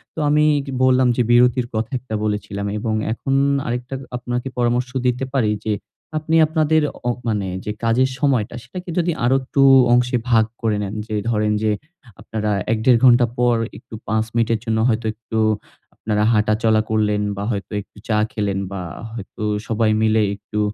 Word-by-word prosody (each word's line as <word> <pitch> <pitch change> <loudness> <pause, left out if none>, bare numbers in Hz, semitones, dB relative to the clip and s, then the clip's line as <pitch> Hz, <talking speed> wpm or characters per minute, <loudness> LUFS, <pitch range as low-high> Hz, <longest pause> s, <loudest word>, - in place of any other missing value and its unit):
তো - - -4
আমি 150 +1 +4 0.2
কি 135 - -6
বললাম 130 0 +4
যে 125 - +1
বিরতির 120 0 +4
কথা 110 +5 -2 0.3
বলেছিলাম 105 -1 -3
এবং 110 0 -2 0.2
এখন 135 +3 -3 0.3
আরেকটা 125 +2 -3 0.2
আপনাকে 125 +1 -3
পরামর্শ 120 +1 +1 0.2
দিতে 125 +1 +1
পারি 115 -6 +2
যে 110 - +1 0.4
আপনি 155 +1 -1
আপনাদের 155 0 +2 0.3
অপ 120 - -1
মানে 105 -3 -1 0.2
যে 105 - -2
কাজের 125 +3 +3
সময়টা 130 -7 +1
সেটাকে 180 +9 -8
যদি 175 0 +2
আরো 130 +2 +3
একটু 135 +1 -1 0.3
অংশে 125 0 +3
ভাগ 110 -2 +4 0.2
করে 110 -2 +1
নেন 100 0 -5
যে 110 - -3
ধরেন 105 -2 +1
যে 110 - +2 0.5
আপনারা 105 -1 -3 0.2
১ 115 - +2
দেড় 120 -3 +5
ঘন্টা 120 -1 +6
পর 120 -1 +3 0.2
একটু - - -16
৫ 110 0 +1
মিনিটের 115 -1 +1
জন্য 110 -1 0
হয়তো 115 0 0
একটু 110 0 -6 0.6
আপনারা 105 -1 -1
হাঁটা 110 0 +2
চলা 110 -1 +4
করলেন 105 -1 +1 0.2
বা 100 - -3
হয়তো 100 -4 -4
একটু 100 - -20
চা 105 - +2
খেলেন 100 -4 -1
বা 95 -1 -4 0.3
হয়তো 110 -2 -9 0.3
সবাই 110 0 +1
মিলে 110 0 +3
একটু 105 +1 -6
115 Hz, 170 wpm, -20 LUFS, 105-125 Hz, 0.6 s, ঘন্টা